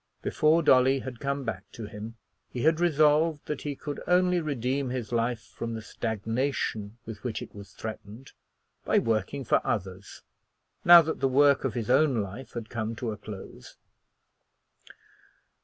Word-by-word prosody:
Before 160 Hz, +2 st, +3 dB
Dolly 130 Hz, -1 st, +5 dB
had 125 Hz, -2 st, -7 dB
come 140 Hz, 0 st, -2 dB
back 100 Hz, -4 st, -5 dB
to 115 Hz, -, -7 dB
him 105 Hz, +2 st, -8 dB, 0.3 s
he 120 Hz, -, -4 dB
had 160 Hz, +1 st, +3 dB
resolved 155 Hz, -1 st, +3 dB
that 150 Hz, -, -4 dB
he 145 Hz, -1 st, -4 dB
could 145 Hz, +1 st, -6 dB
only 180 Hz, 0 st, +3 dB
redeem 135 Hz, -2 st, -1 dB
his 125 Hz, -3 st, -4 dB
life 120 Hz, 0 st, 0 dB
from 115 Hz, -1 st, -4 dB
the 110 Hz, -, -5 dB
stagnation 110 Hz, 0 st, -2 dB
with 110 Hz, -2 st, -9 dB
which 125 Hz, -3 st, -3 dB
it -, -, -9 dB
was 100 Hz, -1 st, -11 dB
threatened 110 Hz, +3 st, -8 dB, 0.5 s
by -, -, +2 dB
working 115 Hz, +5 st, 0 dB
for -, -, +3 dB
others, 95 Hz, -1 st, -4 dB, 0.6 s
now 175 Hz, -1 st, +10 dB
that 160 Hz, +1 st, -3 dB
the 135 Hz, -, +2 dB
work 140 Hz, +1 st, +4 dB
of 130 Hz, -5 st, -2 dB
his 120 Hz, -1 st, -2 dB
own 135 Hz, -2 st, +4 dB
life 105 Hz, +6 st, -6 dB
had 115 Hz, -2 st, -5 dB
come 110 Hz, 0 st, -4 dB
to 115 Hz, -1 st, -3 dB
a -, -, -4 dB
close. 105 Hz, -2 st, -10 dB
125 Hz, 160 wpm, -28 LUFS, 110-145 Hz, 0.6 s, now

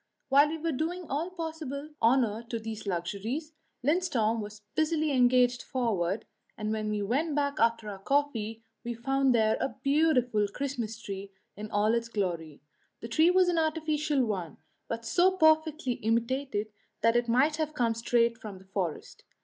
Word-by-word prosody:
While 280 Hz, +2 st, +6 dB
we 320 Hz, +2 st, -3 dB
were 325 Hz, +1 st, -2 dB
doing 335 Hz, +6 st, -2 dB
all 310 Hz, +6 st, -1 dB
possible 315 Hz, -4 st, -5 dB
honour 230 Hz, -2 st, +3 dB
to 230 Hz, -, -2 dB
these 220 Hz, -1 st, -6 dB
luxuries, 205 Hz, -, -3 dB, 0.3 s
Lindström 265 Hz, -9 st, +1 dB
was 210 Hz, 0 st, -8 dB
busily 315 Hz, -1 st, +1 dB
engaged 250 Hz, -1 st, +4 dB
forward, 210 Hz, -6 st, -1 dB, 0.3 s
and 215 Hz, -1 st, -2 dB
when 215 Hz, -1 st, -2 dB
we 210 Hz, -1 st, -1 dB
went 280 Hz, +9 st, 0 dB
back 285 Hz, 0 st, 0 dB
after 230 Hz, -1 st, +2 dB
our 200 Hz, -2 st, -6 dB
coffee 225 Hz, -3 st, -1 dB, 0.2 s
we 240 Hz, -1 st, -4 dB
found 270 Hz, +1 st, +2 dB
there 220 Hz, -1 st, +3 dB
a 245 Hz, -, -2 dB
beautiful 260 Hz, -8 st, +3 dB
Christmas 235 Hz, -2 st, -4 dB
tree 195 Hz, -2 st, -7 dB, 0.2 s
in 210 Hz, +1 st, -7 dB
all 210 Hz, +2 st, +2 dB
its 230 Hz, 0 st, -1 dB
glory. 170 Hz, -9 st, -3 dB, 0.4 s
The 230 Hz, -, -6 dB
tree 315 Hz, +9 st, +4 dB
was 365 Hz, 0 st, +4 dB
an 345 Hz, -2 st, +2 dB
artificial 310 Hz, -3 st, +1 dB
one, 185 Hz, -7 st, -4 dB, 0.3 s
but 230 Hz, 0 st, -4 dB
so 360 Hz, +10 st, +3 dB
perfectly 315 Hz, -4 st, +3 dB
imitated 230 Hz, -1 st, -1 dB, 0.3 s
that 230 Hz, +1 st, +3 dB
it 240 Hz, 0 st, +2 dB
might 270 Hz, +6 st, +3 dB
have 310 Hz, -1 st, -2 dB
come 235 Hz, -3 st, +2 dB
straight 230 Hz, 0 st, +1 dB
from 205 Hz, -3 st, -8 dB
the 190 Hz, -, -16 dB
forest. 185 Hz, -5 st, -4 dB
240 Hz, 165 wpm, -29 LUFS, 215-300 Hz, 0.4 s, While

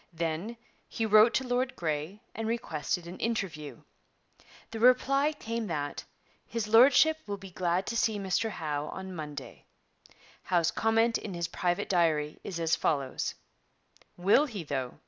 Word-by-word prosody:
Then 170 Hz, +7 st, -3 dB, 0.3 s
he 225 Hz, -, -2 dB
wrote 215 Hz, +2 st, +6 dB
to 265 Hz, -, 0 dB
Lord 250 Hz, +1 st, 0 dB
Grey 160 Hz, +5 st, -3 dB
and 225 Hz, 0 st, -4 dB
requested 180 Hz, -6 st, -2 dB
an 175 Hz, +2 st, -9 dB
interview. 160 Hz, -, -3 dB, 0.9 s
The 225 Hz, -, -5 dB
reply 275 Hz, +4 st, +4 dB
came 230 Hz, -6 st, -4 dB
that 145 Hz, -4 st, -4 dB, 0.4 s
'His 230 Hz, -2 st, -3 dB
Lordship 260 Hz, +8 st, +6 dB
will 200 Hz, 0 st, -3 dB
be 195 Hz, -1 st, -11 dB
glad 180 Hz, +1 st, 0 dB
to 235 Hz, -, -3 dB
see 220 Hz, -2 st, +1 dB
Mr 195 Hz, +3 st, 0 dB
Howe 150 Hz, -6 st, -3 dB
on 190 Hz, +1 st, -7 dB
Monday.' 150 Hz, -4 st, -8 dB, 0.8 s
Howe's 175 Hz, -2 st, +1 dB
comment 225 Hz, +1 st, +2 dB
in 195 Hz, -4 st, -6 dB
his 170 Hz, -1 st, -2 dB
private 175 Hz, -1 st, -1 dB
diary 155 Hz, -4 st, +1 dB
is 180 Hz, -4 st, -5 dB
as 165 Hz, -1 st, +2 dB
follows: 140 Hz, -4 st, -1 dB, 0.8 s
'Will 200 Hz, +12 st, +4 dB
he, 210 Hz, -9 st, -6 dB
though? 135 Hz, -4 st, -4 dB
190 Hz, 145 wpm, -29 LUFS, 160-230 Hz, 0.9 s, wrote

